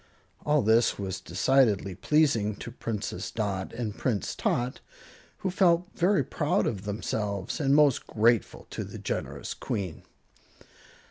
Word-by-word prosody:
All 150 -3 +3
this 110 +2 +3
was 95 -2 -4
decidedly 100 0 +2
pleasing 110 - +2
to 115 - -8
Princess 115 -3 -4
Dot 100 -4 -2
and 110 -4 -4
Prince 110 -7 -1
Tot, 125 +1 -1 0.7
who 190 - +1
felt 180 -1 +3
very 190 +3 +2
proud 150 -2 0
of 100 -3 -3
themselves 105 -1 -3
and 140 -2 +3
most 145 -4 +4
grateful 115 +1 +2
to - - -4
the - - -8
generous - - -4
Queen. 95 -6 -4
115 Hz, 130 wpm, -28 LUFS, 100-140 Hz, 0.7 s, most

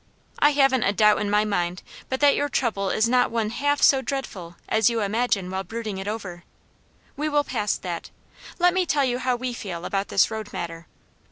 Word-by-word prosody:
I 295 0 +5
haven't 270 -3 +3
a 200 - +2
doubt 210 +1 +4
in 205 - -1
my 210 +1 +3
mind 180 -3 -2 0.3
but 260 +1 -2
that 285 -1 +6
your 290 - -1
trouble 205 -8 -1
is 220 +4 +2
not 250 +1 +3
one 225 -2 -1
half 290 +3 0
so 270 -1 +6
dreadful 205 -12 -5
as 220 +1 +3
you 230 -1 -1
imagine 205 -3 0
while 190 0 -3
brooding 205 -1 -5
over 210 -4 -4
it. 175 - -20 0.7
We 305 +2 -2
will 290 -1 +2
pass 210 -7 -1
that. 175 -2 -6 0.5
Let 355 0 +4
me 370 -1 +1
tell 285 -1 +2
you 245 -1 -1
how 255 -1 0
we 250 0 -4
feel 180 -7 -6
about 195 0 -2
this 195 - +2
road 220 -1 -5
matter. 165 -1 -6
220 Hz, 205 wpm, -24 LUFS, 195-265 Hz, 0.7 s, that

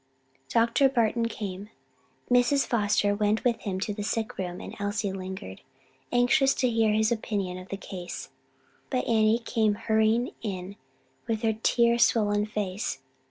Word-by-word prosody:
Dr. 235 +4 +3
Barton 235 -2 +1
came: 200 -2 -6 0.6
Mrs. 245 +3 +4
Foster 205 -2 +2
went 210 +1 +1
with 235 -2 +1
him 190 -3 -3
to 210 - -2
the 205 - -5
sick 220 +1 -2
room 180 -1 -4
and - - -8
Elsie 205 0 -1
lingered, 190 - -7 0.5
anxious 250 +3 +3
to 255 - +1
hear 225 -1 +3
his 220 +1 +2
opinion 200 -5 -2
of 185 - -12
the 195 - -4
case. 180 -3 -7 0.6
But 255 -2 -1
Annie 220 -1 +4
came 220 -3 +1
hurrying 220 +3 +1
in 195 -2 -5 0.5
with 225 0 -2
her 220 -1 +2
tear 235 +2 +2
swollen 210 -2 +3
face. 205 -1 -3
215 Hz, 150 wpm, -27 LUFS, 200-230 Hz, 0.6 s, Mrs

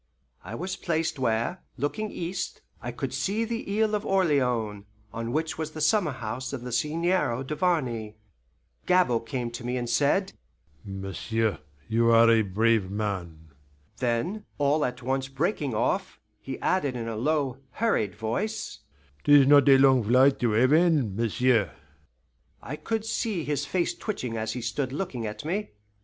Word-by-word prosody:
I 100 +5 -7
was 185 +7 -4
placed 160 -4 -1
where, 120 +8 0 0.2
looking 210 - -2
east, 180 +1 -4 0.2
I - - -4
could - - -4
see 215 +4 0
the 230 0 -3
Island 220 -1 +2
of 210 0 0
Orleans, 125 - +1 0.3
on 115 +1 -4
which 160 +3 -2
was 155 -1 -4
the 155 - -6
summer 155 +2 +2
house 125 +2 -5
of 125 -3 -5
the 125 - -6
Seigneur 150 -1 0
Duvarney. 130 - -1 0.7
Gabord 150 -11 +3
came 120 0 -3
to 120 +1 -7
me 125 +1 -2
and 120 -1 -3
said, 145 +11 +2 0.5
"M'sieu', 100 +2 -2 0.3
you 115 +1 +2
are 115 0 +6
a 115 -1 +5
brave 110 0 +1
man" 90 -6 -4 0.5
then, 130 - -1
all 145 +1 +2
at 125 0 -5
once 135 +1 -1
breaking 140 - -1
off, - - -1 0.2
he 135 -1 -6
added 145 -9 +1
in 115 -2 -4
a 115 - -3
low, 135 +1 0
hurried 110 - 0
voice, 120 - -3 0.4
"'Tis 145 -2 +7
not 145 0 +6
a 135 - +8
long 130 -2 +5
flight 130 +5 +4
to 120 -3 +1
heaven, 135 - +3
m'sieu'!" 115 -2 +2 0.9
I 140 - -6
could 220 +7 -3
see 215 -5 -1
his 145 -1 -2
face 175 +1 0
twitching 125 - -4
as 110 0 -2
he 125 - -4
stood 130 +2 -2
looking 140 - -3
at 105 +5 -7
me. 195 - -2
130 Hz, 155 wpm, -27 LUFS, 115-165 Hz, 0.9 s, a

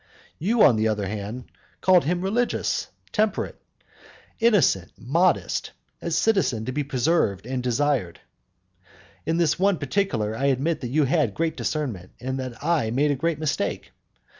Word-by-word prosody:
You, 215 +7 +3
on 120 -6 +6
the 110 +1 +2
other 105 -2 -1
hand, 105 +5 -6 0.3
called 185 -4 +4
him 175 +3 0
religious, 235 +6 0 0.2
temperate, 215 -1 -1 0.8
innocent, 195 - +3
modest; 165 +7 +1 0.3
a - - -3
citizen 165 - +1
to 130 - -2
be 145 +3 -1
preserved 130 - 0
and 130 0 -2
desired. 125 -7 0 1.1
In 165 +1 +1
this 170 -1 +2
one 195 -1 +3
particular 135 - -1
I 135 - -1
admit 140 +4 +1
that 125 - -3
you 150 +5 +2
had 140 - +1
great 165 +5 -1
discernment, 120 - -3
and 130 +1 -3
that 130 0 -6
I 155 -8 +1
made 140 +6 +2
a - - +1
great 165 +3 -1
mistake. 155 -2 -2
145 Hz, 150 wpm, -24 LUFS, 120-170 Hz, 1.1 s, on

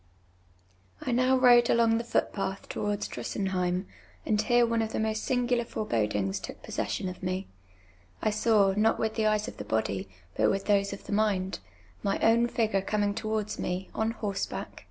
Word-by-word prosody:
I 255 - -2
now 255 +2 +3
rode 245 -2 +6
alon;:: 230 -1 +4
the - - -3
foot])at]i 195 -4 -1
towards 205 0 -2
Drusen 195 -2 -3
heim, 180 0 0 0.4
and 210 -1 +2
here 240 +2 +4
one 230 -1 +1
of 220 0 -3
the - - -1
most 220 0 -1
sinii^ular 245 -1 +1
forebodiui^s 105 - -1
took - - -9
pos - - -9
session 190 - -2
of 180 0 -7
mc. 185 +1 -2 0.7
I 215 - +1
saw, 215 -2 +3
not 220 +2 +3
with 220 0 -1
tlie 220 -1 +1
eyes 215 0 0
of - - -8
the - - -5
bodv, 100 -3 -1 0.3
but - - +3
with 195 0 -1
those 200 -1 +2
of 200 - -7
the - - -8
mind, 200 - +1 0.4
my 195 - 0
own 230 +1 +4
fij^ure 220 -5 0
eomin«; 205 0 0
towards 215 -1 -2
me, 180 +1 -3
on 220 0 0
hoi 215 -3 -3
seback. - - -4
210 Hz, 185 wpm, -28 LUFS, 195-225 Hz, 0.7 s, rode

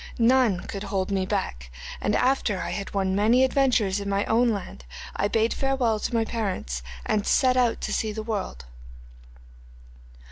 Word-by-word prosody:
None 235 -5 +3
could 195 - -6
hold 195 -1 -2
me 190 -1 0
back, 65 - -3 0.3
and 210 - +1
after 250 -7 +1
I - - -3
had 200 -1 -4
won 190 -1 0
many 225 +6 +4
adventures 250 -7 +2
in 200 0 -4
my 200 +1 0
own 235 +2 +3
land, 190 - -4 0.3
I 200 - +1
bade 225 +2 +1
farewell 260 -5 0
to 240 - -3
my 225 -1 +2
parents 190 - -3 0.2
and 210 - +1
set 255 -1 +3
out 245 -2 +2
to - - -2
see 220 - -1
the 215 +1 -5
world. 200 - -4
210 Hz, 170 wpm, -25 LUFS, 195-240 Hz, 0.3 s, many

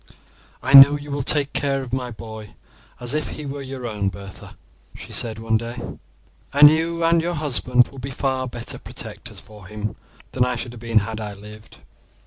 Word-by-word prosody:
"I 130 - 0
know 140 +1 +11
you 145 0 -9
will 140 0 -1
take 145 +1 +2
care 135 -1 0
of 125 -1 -9
my 125 -1 -2
boy 110 -2 -10 0.4
as 120 +1 -3
if 155 0 -1
he 150 - -7
were 140 0 -5
your 130 -2 -7
own, 105 -4 -1
Bertha," 95 +1 -11 0.4
she - - -10
said 115 -2 -3
one 110 0 +1
day; 115 +2 -6 0.7
"and 145 +1 +8
you 165 +1 0
and 165 0 +4
your 175 +1 -2
husband 125 -4 +1
will 135 - -11
be 135 +2 -5
far 130 -1 -1
better 120 -1 -7
protectors - - -8
for 105 -4 -14
him 105 0 -5 0.4
than 125 - +1
I 125 0 0
should 120 0 -5
have 120 - -11
been 115 -1 0
had 110 0 -5
I 105 -2 -6
lived. 105 +2 -13
125 Hz, 195 wpm, -22 LUFS, 110-140 Hz, 0.7 s, know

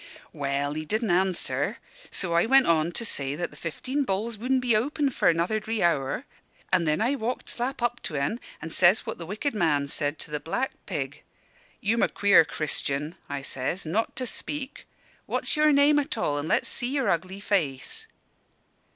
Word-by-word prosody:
"Well, 140 0 -1
he 155 +1 -3
didn' 215 +5 -1
answer; 185 0 +1 0.3
so 175 -3 0
I 170 +5 +3
went 270 +1 +6
on 165 0 +3
to 230 - -1
say 140 -8 0
that 175 +3 -3
the - - -14
'Fifteen 260 - -2
Balls' 220 0 -2
wudn' 255 +5 +1
be 245 -3 +2
open 280 +5 +1
for - - +3
another 170 +6 +1
dree 220 -1 -2
hour; 165 - +1 0.5
and 175 -3 +3
then 155 +6 +2
I 240 +5 +2
walked 250 -2 -3
slap 250 +1 -3
up 240 0 0
to 155 - -5
en, 140 +12 -1 0.2
and 160 - -4
says 180 +3 +5
what - - -5
the 165 - -6
Wicked 215 - -2
Man 150 -8 +1
said 145 +1 -1
to 150 - -7
the 150 - -1
black 205 - -2 0.2
pig. - - -4 0.6
'You'm 225 +3 +1
a - - +3
queer 200 -4 +5
Christian,' 150 -1 -2 0.2
I 140 -1 -4
says, 135 +7 -3
'not 205 +8 -1
to 255 - -3
speak. 275 +3 -4 0.4
What's - - 0
your 305 0 +5
name 290 +1 +5
at 280 - -2
all? 145 -9 0
And 145 - -4
let's - - +2
see 245 -1 -1
your 270 -3 +1
ugly 185 +3 -1
face.' 195 - -1
190 Hz, 190 wpm, -27 LUFS, 155-245 Hz, 0.6 s, went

